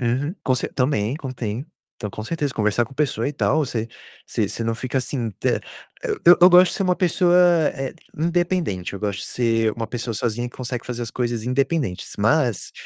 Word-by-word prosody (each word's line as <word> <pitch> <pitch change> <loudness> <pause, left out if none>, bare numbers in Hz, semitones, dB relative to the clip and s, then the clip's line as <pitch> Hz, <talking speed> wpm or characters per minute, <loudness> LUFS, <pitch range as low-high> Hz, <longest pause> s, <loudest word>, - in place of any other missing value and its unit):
Uhum, 130 +7 0
com 130 - +2
cer 125 - -3
também, 125 -3 +1
contém. 130 -4 -4 0.3
Então 105 - -5
com 110 - -7
certeza, 145 0 -2
conversar 105 +1 +1
com 115 - -14
pessoa 140 0 0
e - - -4
tal, 150 +1 +1
você 115 -3 -3 0.4
você - - -1
você 115 - -4
não 115 0 0
fica 130 +3 -2
assim 125 -3 -2
t - - -1 0.6
eu 175 +1 +9
eu 180 - +9
gosto 180 0 +7
de - - -3
ser - - 0
uma 180 -1 +2
pessoa, 175 0 +3 0.4
eh, 135 -2 -5 0.2
independente. 170 - 0
Eu 100 - -5
gosto 100 -2 -2
de - - -5
ser 115 -2 +1
uma 115 +1 -4
pessoa 120 0 -4
sozinha 120 +2 -2
que - - -17
consegue 125 -1 -4
fazer 120 -1 -4
as 115 - -4
coisas 120 -3 -2
independentes, 130 - -1
mas, - - +1
125 Hz, 200 wpm, -22 LUFS, 115-150 Hz, 0.6 s, eu